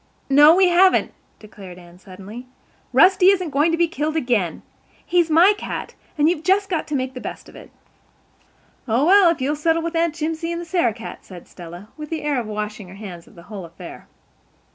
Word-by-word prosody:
"No, 295 +4 +7
we 375 0 +4
haven't," 370 +2 +3 0.2
declared 195 -4 -13
Anne 175 0 -16
suddenly. 200 +6 -11 0.4
"Rusty 375 0 +5
isn't 365 -5 0
going 295 +4 +2
to 330 - 0
be 340 0 +2
killed 310 0 -3
again. 235 - -1 0.4
He's 345 -2 +1
my 340 +6 +5
cat—and 305 -6 -4
you've 335 -2 0
just 385 +4 +1
got 335 -4 -2
to 300 - -3
make 260 -1 -3
the 255 - -8
best - - -8
of - - -16
it." - - -13 1.2
"Oh, 240 +5 +1
well, 385 0 +6
if 335 -5 -2
you'll 285 +3 -1
settle 325 +2 0
with 335 0 -4
Aunt 330 -1 0
Jimsie 325 +1 -3
and 340 - -4
the 345 - -7
Sarah 325 - 0
cat," 230 - -10
said 180 -3 -13
Stella, 175 +3 -12
with 300 -1 -8
the 325 -2 -4
air 290 -3 0
of 230 - -6
one 215 - -6
washing 210 -1 -5
her 185 - -13
hands 185 -5 -10
of - - -20
the 170 - -14
whole 200 0 -9
affair. 170 0 -12
295 Hz, 210 wpm, -21 LUFS, 210-335 Hz, 1.2 s, No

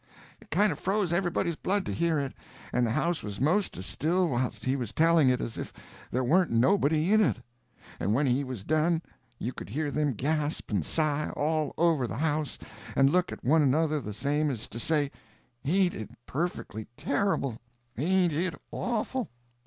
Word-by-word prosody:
It - - -18
kind 200 +5 +3
of 145 - -5
froze 190 -2 0
everybody's 175 -2 0
blood 195 +5 0
to - - -2
hear 170 -1 +1
it, 140 -2 -2 0.4
and 125 -1 +2
the - - -1
house 160 +8 0
was 100 -1 -6
'most 180 - +1
as 90 - -6
still 175 +4 +1
whilst 125 -1 -2
he 130 +1 +2
was 120 -5 -3
telling 165 -3 +5
it 125 0 +2
as 115 - -4
if - - -5 0.4
there 130 +2 0
warn't 175 +8 +3
nobody 155 - +3
in 215 - +6
it. 185 - +1 0.6
And 100 - 0
when 140 +3 +2
he 130 +2 +2
was 130 -7 -6
done, 160 +5 +1 0.3
you 125 +2 -3
could - - -8
hear 145 +6 -2
them 150 -1 +1
gasp 150 +5 -1
and 100 -6 +1
sigh, 150 - +1
all 155 0 0
over 160 -6 +3
the 115 - -5
house, 150 0 -1 0.4
and 135 0 +5
look 180 +1 +2
at - - -8
one 155 +5 +5
another 150 +2 +2
the 105 - -6
same 145 +8 0
as 120 -6 -3
to 115 - -5
say, 145 +1 +1 0.5
"Ain't 180 +4 +3
it 110 - -6 0.2
perfectly 135 - -3
terrible—ain't 140 - -1
it 170 +3 0 0.2
awful!" 245 +1 -2
150 Hz, 185 wpm, -28 LUFS, 130-170 Hz, 0.6 s, in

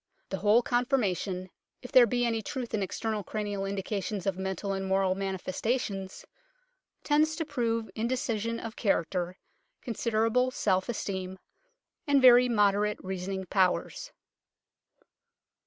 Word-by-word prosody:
The 195 - -2
whole 215 +4 +4
conforma 245 -5 +1
tion, 185 0 -5 0.3
if 250 - -9
there 245 -2 +7
be 245 +2 +1
any 225 -1 0
truth 245 +2 -5
in 215 - 0
external 215 +2 -2
cranial 205 0 -3
indications 195 0 -3
of 195 -2 0
mental 190 +1 -3
and 195 0 -3
moral 190 -1 +2
manifestations, 195 +1 -3 0.8
tends 310 +1 +2
to 325 - -3
prove 230 -4 -1
indecision 230 -1 -2
of 225 0 -7
character, 180 -3 -1 0.5
consider 225 -1 0
able 250 +3 +2
self 190 -4 0
esteem, 190 -4 -4 0.7
and 285 -1 +5
very 250 -1 +7
moderate 210 -1 +2
reasoning 190 0 -4
powers. 190 - 0
210 Hz, 125 wpm, -29 LUFS, 190-240 Hz, 0.8 s, there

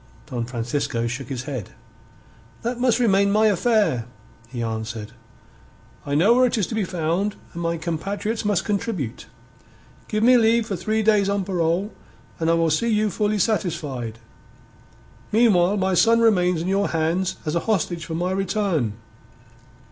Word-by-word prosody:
Don 120 -2 -2
Francisco 120 0 -2
shook 125 +2 -4
his 130 -3 -4
head. 130 -7 -5 0.9
"That 240 +1 -2
must 245 -2 +3
remain 200 -4 +3
my 215 +2 +3
affair," 210 - +2 0.4
he 120 -2 -4
answered. 110 -1 -4 1.0
"I 140 - -1
know 190 +10 +5
where 255 +1 +4
it 240 - -1
is 205 - +1
to - - -6
be 220 -2 0
found, 180 +4 -1 0.2
and 170 - -6
my 170 0 -1
compatriots 200 +7 -3
must 205 -4 0
contribute. 195 - -3 0.8
Give 215 0 -1
me 250 +2 +7
leave 230 0 +3
for 205 - -3
three 215 +5 -1
days 210 -2 +3
on 200 -1 0
parole, 180 +2 0 0.5
and 165 0 0
I 165 - +4
will 165 -1 +2
see 230 +10 +1
you 215 -1 +1
fully 210 +3 0
satisfied. 150 - -2 1.1
Meanwhile 205 -4 +4
my 190 -1 +1
son 230 +5 +4
remains 180 -7 +3
in - - -4
your 195 +1 +1
hands 170 +4 0
as 155 - -1
a 170 - +2
hostage 175 -5 0
for 165 -1 -5
my 175 +2 -1
return." 190 - 0
185 Hz, 160 wpm, -23 LUFS, 155-215 Hz, 1.1 s, me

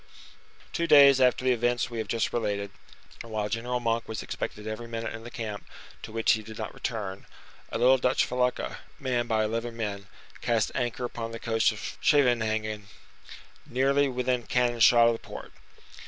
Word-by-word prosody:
Two 170 -1 0
days 140 -3 +8
after 125 0 +3
the 130 - +4
events 120 +1 0
we 115 - -4
have 110 - -3
just 115 -2 -1
related, 100 -3 -2 0.5
and 115 - -10
while 105 -1 -2
General 120 +3 -2
Monk 115 -1 -1
was 110 -1 -5
expected 105 - -5
every 110 +2 -5
minute 115 -1 -4
in 115 0 -8
the 120 - -8
camp 110 -4 -5 0.4
to - - -8
which 115 0 +2
he 110 - +2
did 110 0 -10
not 110 - -5
return, 100 -5 -5 0.4
a - - -1
little 130 +3 +5
Dutch 125 0 +2
felucca, 125 0 -1 0.2
manned 125 -3 -1
by 110 -1 +2
eleven 115 +2 -3
men, 100 -3 -4 0.3
cast 115 -3 +1
anchor 120 +1 -2
upon 115 -1 -5
the 115 - -6
coast 115 0 +2
of 110 - -7
Scheveningen, 110 -6 +2 0.8
nearly 140 +3 +2
within 125 -2 -1
cannon 120 -1 +1
shot 115 +1 +7
of 115 - +4
the 115 - -5
port. - - -10
115 Hz, 180 wpm, -27 LUFS, 110-125 Hz, 0.8 s, days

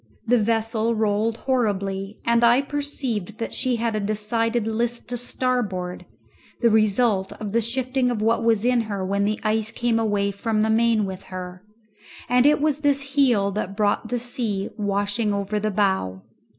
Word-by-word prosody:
The 245 +1 +3
vessel 225 +1 0
rolled 215 +1 0
horribly, 200 -6 -1
and 235 0 +3
I 240 +3 +5
perceived 265 -8 -3
that 230 - -4
she 255 -2 +1
had 230 -1 -1
a - - 0
decided 215 +2 -1
list 235 +2 -1
to 245 - -2
starboard, 235 -7 -2 0.5
the 235 -2 +3
result 215 -2 +2
of 210 -2 -6
the 230 +2 +2
shifting 255 +2 0
of 240 -3 -1
what 225 +2 +1
was 225 -1 +2
in 250 -1 +3
her 195 -2 -2
when 200 +1 0
the 215 +1 -1
ice 215 0 0
came 235 -1 0
away 205 -2 0
from 215 +2 -1
the 220 0 +2
main 225 -1 +3
with 190 0 -7
her, 180 0 -8 0.6
and 250 +2 +4
it 300 - +4
was 300 -1 +1
this 275 -2 0
heel 240 -9 +3
that 195 -1 -4
brought 210 +1 +1
the 245 - -1
sea 230 -5 -2
washing 205 +1 -1
over 200 +1 -2
the 215 +1 -1
bow. 190 - 0
220 Hz, 175 wpm, -23 LUFS, 205-240 Hz, 0.6 s, I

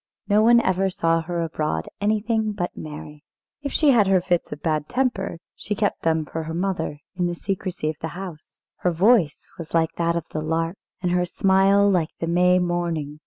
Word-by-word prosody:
No 210 0 +4
one 235 +2 +6
ever 190 -2 +1
saw 165 -2 +1
her 170 +1 -2
abroad 150 - -2
anything 215 +1 +1
but 175 -4 -3
merry. 150 -1 -9 0.4
If 280 -1 -4
she 300 -3 +4
had 220 -6 +4
her 190 -1 +4
fits 175 -1 -1
of 150 - -7
bad 155 -2 -1
temper, 240 -9 -1 0.2
she 205 +4 -4
kept 205 0 -1
them 160 -1 +1
for 160 - -4
her 160 +1 -5
mother, 175 -4 -2 0.2
in 180 -1 +1
the 175 - -3
secrecy 185 -3 -3
of 155 -1 -2
the 160 - -2
house. 180 -5 -9 0.2
Her 180 - 0
voice 180 -2 +3
was 165 0 -6
like 165 -1 +2
that 170 0 +1
of 170 - -1
the 155 - -3
lark, 165 +3 -1 0.3
and 180 - +1
her 180 0 +2
smile 195 +2 +3
like 180 -5 +2
the - - -1
May 180 +2 +4
morning. 170 -4 -2
175 Hz, 200 wpm, -23 LUFS, 160-195 Hz, 0.4 s, one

